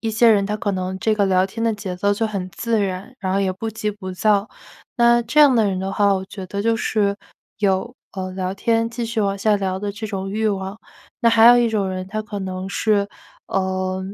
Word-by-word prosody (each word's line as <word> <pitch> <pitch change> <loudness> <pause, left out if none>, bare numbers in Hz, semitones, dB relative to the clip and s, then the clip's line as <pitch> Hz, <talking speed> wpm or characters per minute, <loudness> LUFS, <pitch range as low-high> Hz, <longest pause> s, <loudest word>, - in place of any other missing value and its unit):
一 225 - -2
些 230 +1 +5
人， 200 -2 +3
他 210 0 -2
可 205 -1 -2
能 185 0 -3
这 220 - +2
个 205 -2 +2
聊 185 0 +3
天 225 +4 -4
的 225 -1 +1
节 195 -3 -5
奏 200 +2 +1
就 225 - -1
很 195 -4 -3
自 225 +4 -1
然， 195 +6 -4
然 190 -2 -2
后 195 - +1
也 190 -1 0
不 225 +4 -5
急 215 -1 -3
不 190 -3 -7
躁， 205 +2 +2 0.5
那 235 0 +5
这 235 +6 +2
样 275 -4 +7
的 220 -2 +3
人 190 - -1
的 195 +1 -3
话， 200 0 +3
我 190 0 -3
觉 190 -2 -8
得 200 +2 -4
就 230 0 +2
是， 205 -3 0 0.4
有 205 +5 0 0.2
呃， 185 -1 -4
聊 185 0 -3
天 230 +2 +1
继 235 0 -4
续 225 -1 -2
往 200 -1 0
下 210 +1 +2
聊 190 -1 -2
的 205 -1 -2
这 215 +2 -6
种 195 -2 -4
欲 220 +1 -1
望。 195 0 -2 0.4
那 235 - +3
还 230 0 +6
有 245 0 +9
一 235 -1 +3
种 205 -3 0
人， 185 0 -4
他 215 +2 -4
可 210 -1 -6
能 190 0 -5
是， 205 -1 +1 0.4
呃， 185 0 -1
205 Hz, 260 characters per minute, -21 LUFS, 190-225 Hz, 0.5 s, 有